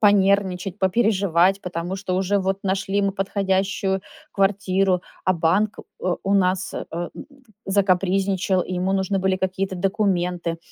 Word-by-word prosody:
понервничать, 195 -2 +2
попереживать, 195 -2 +2
потому 175 0 -4
что 185 -2 -2
уже 195 +2 +1
вот 190 0 -1
нашли 195 +1 0
мы 195 -1 +1
подходящую 195 0 0 0.3
квартиру, 195 -2 +2 0.2
а 185 - +3
банк, 185 +5 +1 0.2
э, 180 - 0
у 195 - +2
нас, 185 -1 +1
э, - - -4
м, 170 +1 -3 0.5
закапризничал, 190 -1 +1
ему 185 +1 -1
нужны 195 0 0
были 190 0 +1
какие-то 190 0 -2
документы. 180 -3 0
190 Hz, 130 wpm, -23 LUFS, 185-195 Hz, 0.5 s, а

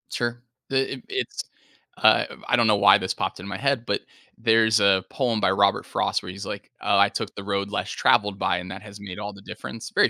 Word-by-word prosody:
Sure, 120 0 -3 0.3
it 135 - -3 0.2
it - - -21
it's, 395 +1 -3 0.5
uh, - - +5 0.2
I - - +3
don't 120 -2 +3
know 105 - +5
why 100 0 +7
this 95 - -2
popped - - -3
in 95 - -8
my 100 - -4
head, 140 -4 0
but 100 - -1 0.4
there's 110 -1 +4
a 100 -2 +4
poem 120 -5 0
by 95 - +2
Robert 100 +1 +2
Frost - - -1
where 90 - -6
he's 100 +1 -8
like, - - -7
"Oh, - - +2
I - - +5
took - - -4
the 100 - -7
road 100 0 -2
less 105 - -3
traveled 105 -1 +2
by, 95 -2 +1
and 90 +1 -6
that 95 - -7
has 100 -1 -12
made 95 -3 -8
all 105 0 -5
the 100 - -14
difference." 115 +2 -8
Very - - +4
100 Hz, 240 wpm, -24 LUFS, 100-115 Hz, 0.5 s, why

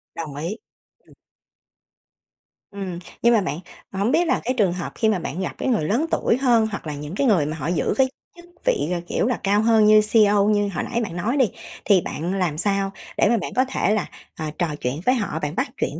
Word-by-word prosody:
Đồng 155 -4 -6
ý, 170 +9 -4 0.4
ừm. - - -23 1.6
Ừm, 190 -3 -5 0.2
nhưng 235 0 +5
mà 225 - +4
bạn, 160 -4 -3 0.3
hổng 200 +4 0
biết 335 +4 +2
là - - +2
cái 255 - 0
trường 195 -6 +3
hợp 175 -1 -5
khi 220 - +2
mà 205 -4 +1
bạn 175 +2 -4
gặp 185 - -2
cái - - -2
người 225 -10 +1
lớn 235 - +1
tuổi 230 - +2
hơn, 240 -4 +3
hoặc 200 - -6
là 150 - -3
những 150 +4 -7
cái 275 - +1
người 185 -10 +3
mà 155 +2 -4
họ 145 -1 -4
giữ 170 -2 0
với 265 -1 +4 0.3
chức 345 0 -14 0.2
vị, 145 +3 +1
ờ, 175 - -1
kiểu - - 0
là, 250 - -1
cao 205 +1 +3
hơn 220 -1 +4
như 215 0 +7
CEO 210 -1 +4
như 205 -1 +2
hồi - - -2
nãy 235 -1 -2
bạn 185 -6 -5
nói 220 +10 -1
đi. 260 -6 +3 0.3
Thì 195 -4 +5
bạn 170 +3 -4
làm 180 -6 -1
sao 195 +2 +1 0.3
để - - +4
mà 235 - +3
bạn 195 - -4
có 255 +1 +3
thể 210 - +1
là, 210 -3 0 0.3
ờ, 160 - -3
trò 175 - +1
chuyện 125 +4 -2
với 255 - +4
họ, 205 -9 -2
bạn 150 -1 -3
bắt 255 +5 0
chuyện 145 +4 -2
200 Hz, 240 wpm, -22 LUFS, 170-230 Hz, 1.6 s, như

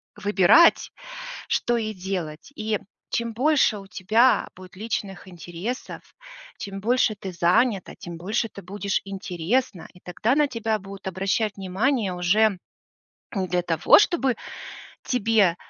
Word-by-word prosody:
выбирать, 205 - +5 0.6
что 240 - +1
ей 215 -1 -3
делать. 185 - -5
И 215 -1 -1 0.3
чем 235 0 -1
больше 265 -3 +3
у 195 - -11
тебя 215 +7 +2
будет 185 0 -13
личных 200 -2 -4
интересов, 175 +7 -6 0.6
чем 195 -2 -6
больше 235 +1 +2
ты 195 -2 -7
занята, 185 +5 +1
тем 170 -1 -8
больше 210 +6 -1
ты 200 - -11
будешь 200 +1 -2
интересна, 195 +2 -2
и 180 - -17
тогда 210 +7 0
на 295 -1 +3
тебя 225 -3 -1
будут 195 0 -11
обращать 195 +3 -1
внимание 195 +2 0
уже 195 +3 +2 0.8
не 190 -3 -1
для 180 0 0
того, 165 -2 +5
чтобы 290 - +2 0.7
тебе 220 -7 +2
200 Hz, 130 wpm, -24 LUFS, 185-230 Hz, 0.8 s, выбирать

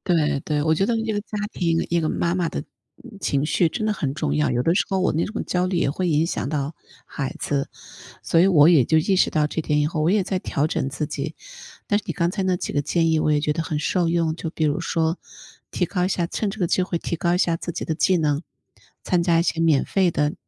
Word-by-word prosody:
对 150 -3 +1
对。 150 -1 0
我 160 +1 +3
觉 195 +5 +1
得 235 - 0
一 225 0 -2
个 205 - -1
家 210 0 -7
庭， 165 -2 0
一 170 - +2
个 160 - -1
妈 170 0 0
妈 180 -2 0
的 - - -4 0.4
嗯 205 - -12
情 140 -6 0
绪 170 +2 +2
真 215 +7 -3
的 215 - +1
很 145 -10 -2
重 105 - -2
要。 75 -1 +2
有 120 - 0
的 165 - +3
时 190 - +2
候 190 - 0
我 185 - +2
那 160 - 0
种 220 +2 -4
焦 180 0 0
虑 185 - -2
也 170 - +1
会 180 +6 -2
影 155 -1 +2
响 165 - -3
到 145 0 -2 0.3
孩 135 -2 -5
子， 140 -1 -1 0.6
所 165 - +2
以 180 - +6
我 160 -4 +6
也 150 -8 +5
就 160 - +3
意 185 +5 +2
识 - - +4
到 155 -1 +1
这 160 - -3
点 150 -1 +1
以 - - +2
后 155 0 -2
我 155 - +2
也 200 +1 +3
在 185 0 -2
调 145 -4 -1
整 155 - -1
自 145 +2 -3
己。 145 +1 -5 0.5
但 205 - +2
是 - - -15
你 - - -2
刚 170 -1 0
才 195 - -3
那 185 -1 +1
几 - - -4
个 145 - 0
建 165 +3 +1
议 160 - +2
我 155 - +1
也 145 - +1
觉 150 - 0
得 160 +2 -1
很 155 -1 -3
受 170 +3 0
用。 165 -1 +1
就 160 0 -5
比 160 - -3
如 150 +3 +1
说 165 0 0 0.5
提 180 - 0
高 180 +1 -1
一 - - +1
下 180 -2 0
趁 205 +4 -2
这 205 - -7
个 175 - +1
机 185 - +1
会 180 -1 -2
提 170 - -4
高 175 +2 +1
一 - - +1
下 170 -3 +1
自 175 - -6
己 - - -4
的 160 - -2
技 185 +4 +2
能， 150 -3 +1 0.6
参 180 -3 +1
加 170 -1 +3
一 - - 0
些 165 - -1
免 160 -4 +3
费 190 -2 +1
的， 150 -2 0
165 Hz, 300 characters per minute, -23 LUFS, 150-180 Hz, 0.6 s, 以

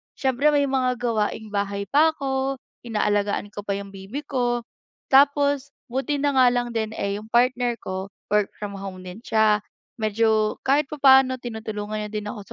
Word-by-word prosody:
siyempre 265 +1 +1
may 285 - +3
mga 255 -1 +1
gawaing-bahay 210 -3 -1
pa 315 +2 +4
ako, 270 -1 -1 0.3
inaalagaan 205 -2 0
ko 205 - -8
pa 200 -1 -2
yung 200 0 -7
baby 200 +10 -7
ko. 245 -4 -1 0.5
Tapos 285 0 +4 0.2
buti 270 +3 -1
na 285 0 +1
nga 255 - +7
lang 245 -1 +1
din, 220 -1 -3
eh, 200 0 -2
yung 215 - -12
partner 245 +1 +2
ko 190 -3 -5 0.2
work 210 -1 +3
from 205 -1 -6
home 185 -1 -7
din 180 +3 -9
siya, 220 -2 +3 0.4
medyo 215 0 +2
kahit 280 +2 +2
papaano 265 -2 +5
tinutulungan 220 -3 -5
niya - - -13
din 210 -1 -3
ako - - -8
230 Hz, 165 wpm, -24 LUFS, 210-265 Hz, 0.5 s, nga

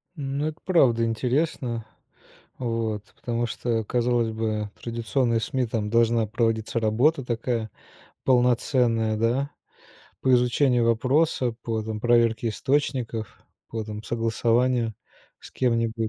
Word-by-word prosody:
Ну, 140 +1 -2
это 155 - -6
правда 125 -11 +4
интересно. 120 -1 -1 0.7
Вот, 115 -3 -2 0.2
потому 120 0 -1
что, 115 -1 -1
казалось 120 0 +1
бы, 110 -1 -2
традиционные 115 0 0
СМИ- 125 +3 -1
там 110 -2 -2
должна 115 0 +3
проводиться 115 +1 0
работа 120 +6 +2
такая 115 -2 -2 0.5
полноценная, 120 -3 +2
да, 125 +6 0 0.7
по 130 - +2
изучению 125 0 +3
вопроса, 125 +2 +2
по, 115 -1 -2
там, 110 0 -5
проверке 115 -1 +3
источников, 120 -3 -1 0.3
по, 110 -1 -4
там, 105 0 -7
согласованию 115 +1 +1 0.5
с - - -12
кем-нибудь. 115 -2 0
115 Hz, 110 wpm, -25 LUFS, 115-125 Hz, 0.7 s, правда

